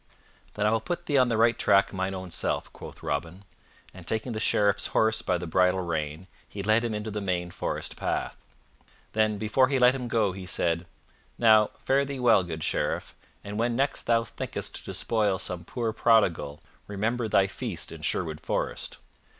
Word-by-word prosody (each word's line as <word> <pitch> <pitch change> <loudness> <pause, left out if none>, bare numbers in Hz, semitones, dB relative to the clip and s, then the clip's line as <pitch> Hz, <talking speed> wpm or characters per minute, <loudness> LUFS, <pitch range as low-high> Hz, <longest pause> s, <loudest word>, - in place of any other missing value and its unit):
"Then 105 - 0
I 105 - +4
will 115 -1 +1
put 175 +9 -4
thee 145 -2 +3
on 130 - +4
the 115 -2 0
right 115 +1 +4
track 100 -1 +4
mine 95 0 -2
own 95 -1 -7
self," - - -2
quoth - - -11
Robin, 85 +7 -3 0.5
and, 90 -2 -12
taking 110 +4 -1
the 110 - -3
Sheriff's 105 -2 +2
horse 110 0 +3
by 90 - 0
the 90 - -5
bridle 90 +2 +2
rein, 80 -1 -3 0.2
he 100 - -6
led 110 +3 +3
him 115 -2 -2
into 105 +1 -4
the 105 0 -3
main 90 -2 -2
forest - - -4
path. - - -3 0.7
Then, 110 -1 +2
before 110 +5 +3
he 135 0 +1
let 125 0 +6
him 125 -2 -4
go, 110 -4 +1
he 95 -1 -8
said, 85 0 0 0.5
"Now, 110 -2 +6 0.2
fare 135 +1 +3
thee 140 -1 -5
well, 115 -5 +5
good 80 -3 -5
Sheriff, - - -1 0.3
and 105 +1 -5
when 120 +1 +1
next 135 +3 0
thou 115 -1 +3
thinkest - - -4
to - - -11
despoil 105 -4 0
some 90 -2 -3
poor 115 0 -2
prodigal, 95 -11 +2 0.3
remember 110 +4 -1
thy 100 -2 +4
feast 95 - -4
in - - -9
Sherwood 80 -1 -1
Forest. - - -3
105 Hz, 190 wpm, -27 LUFS, 90-115 Hz, 0.7 s, let